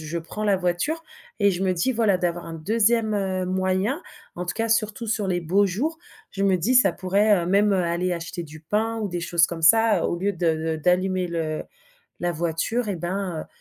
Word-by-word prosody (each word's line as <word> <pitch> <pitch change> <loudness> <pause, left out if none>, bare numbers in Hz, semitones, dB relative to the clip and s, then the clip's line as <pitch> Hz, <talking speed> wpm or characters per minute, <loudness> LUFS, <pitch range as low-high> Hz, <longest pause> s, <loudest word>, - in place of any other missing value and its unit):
je 160 +2 -4
prends 165 +6 -7
la 205 -2 +3
voiture 180 - -1 0.4
et 200 -2 +4
je 180 +1 -3
me 185 -1 +2
dis, 180 +10 0
voilà 215 -6 +2
d'avoir 175 -1 -2
un 165 - -7
2e, 220 +5 +1
heu, 190 -2 -1
moyen 190 - 0 0.3
en 180 - -4
tout 175 - -3
cas, 225 0 -1
surtout 220 0 0
sur 210 -2 -1
les 175 -1 0
beaux 190 +5 +2
jours, 285 - -2 0.3
je 195 - -3
me 195 -2 +3
dis: 225 +10 0
«Ça 225 -6 +6
pourrait, 200 +4 +2
heu, - - -5
même, 200 +2 +3
heu, 185 - +2
aller 175 +2 -1
acheter 170 +1 -5
du 155 -1 -11
pain 220 +7 -1
ou 215 - -2
des 175 -1 -3
choses 170 0 +3
comme 165 -1 -7
ça, 225 +5 +5
au - - -1
lieu 200 +3 -1
de 160 -2 -1
d'allumer 185 0 +1
le 160 -2 -2 0.6
la 175 0 +1
voiture 170 +9 -1
et 190 - -2
ben, 175 -1 -3
185 Hz, 210 wpm, -24 LUFS, 170-210 Hz, 0.6 s, Ça